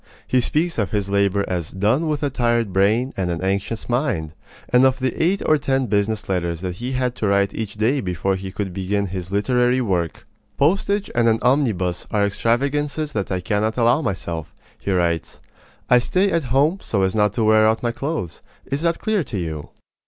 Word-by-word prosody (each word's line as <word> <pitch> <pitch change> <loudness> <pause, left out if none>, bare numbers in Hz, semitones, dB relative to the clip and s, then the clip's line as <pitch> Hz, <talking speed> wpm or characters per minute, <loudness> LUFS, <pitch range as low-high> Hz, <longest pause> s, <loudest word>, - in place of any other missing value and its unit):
He 130 - +2
speaks 160 +4 0
of 105 - 0
his 100 -2 -2
labor 100 0 +2
as 85 -3 -2
"done 110 - +1
with 150 -1 -1
a 145 - 0
tired 120 -5 0
brain 110 +7 +2
and 95 -2 -1
an 85 -1 -2
anxious 100 +4 -2
mind," 120 - -1 0.4
and 125 +1 +5
of 130 0 +4
the 130 0 -1
eight 190 +4 +1
or 155 -1 +4
ten 135 -2 0
business 105 0 0
letters 85 -3 -1
that 90 -2 -4
he 125 +4 -4
had 125 -1 0
to 105 - -1
write 100 0 +2
each 110 -2 -5
day 120 +6 +1
before 90 +1 -1
he 95 0 -6
could 95 -2 -4
begin 100 +2 -1
his 90 -1 -5
literary 125 +5 +2
work. 90 -9 -1 0.3
"Postage 195 +7 +1
and 120 -1 +3
an 110 - +3
omnibus 110 -10 +1
are 105 -1 +2
extravagances 140 +8 0
that 100 -5 -2
I 90 -1 -1
cannot 110 +3 -1
allow 120 +5 +3
myself," 85 - -4 0.2
he - - -5
writes. 85 -3 0 0.5
"I 125 - +6
stay 185 +11 +1
at 165 -4 0
home 140 +9 +2
so 100 -3 0
as 95 0 +1
not 105 -2 +2
to 115 - 0
wear 110 0 +5
out 110 +2 +1
my 120 - +1
clothes. 135 - -4 0.2
Is 140 +2 -3
that 170 0 +1
clear 215 -5 0
to 110 - -5
you?" 80 -4 -4
110 Hz, 200 wpm, -21 LUFS, 95-130 Hz, 0.5 s, I